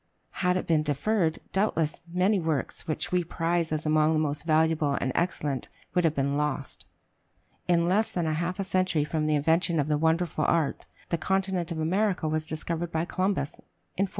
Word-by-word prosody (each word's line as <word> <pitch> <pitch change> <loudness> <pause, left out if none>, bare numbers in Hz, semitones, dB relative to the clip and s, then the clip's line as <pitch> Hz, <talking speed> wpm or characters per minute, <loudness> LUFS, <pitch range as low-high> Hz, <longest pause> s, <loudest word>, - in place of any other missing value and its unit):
Had 180 -1 +3
it - - -3
been 160 -2 +3
deferred, 160 +4 0 0.2
doubtless 175 -6 0
many 190 +3 +2
works 160 -5 -2
which 155 - -2
we 180 -1 +2
prize 165 0 -1
as 155 0 -2
among 155 +1 +3
the 155 - +2
most 150 0 -2
valuable 155 -2 +2
and 130 - -1
excellent 150 -6 -1 0.2
would 180 -1 +2
have 160 -1 +2
been 140 +1 0
lost. 145 -2 -3 0.8
In 170 -1 +3
less 200 +5 +2
than 175 -2 -1
a 155 - 0
half 175 +4 -2
century 185 -5 +1
from 155 +1 -1
the 155 - +2
invention 165 +3 +2
of 145 - +1
the 150 -1 +1
wonderful 160 0 +1
art, 160 -4 0 0.2
the 170 - 0
continent 190 -2 0
of 165 - -3
America 180 +2 +1
was 155 0 -1
discovered 165 +2 -3
by 160 +1 0
Columbus, 185 -5 -1 0.4
in 195 - +4
1492. - - -6
160 Hz, 185 wpm, -27 LUFS, 155-180 Hz, 0.8 s, in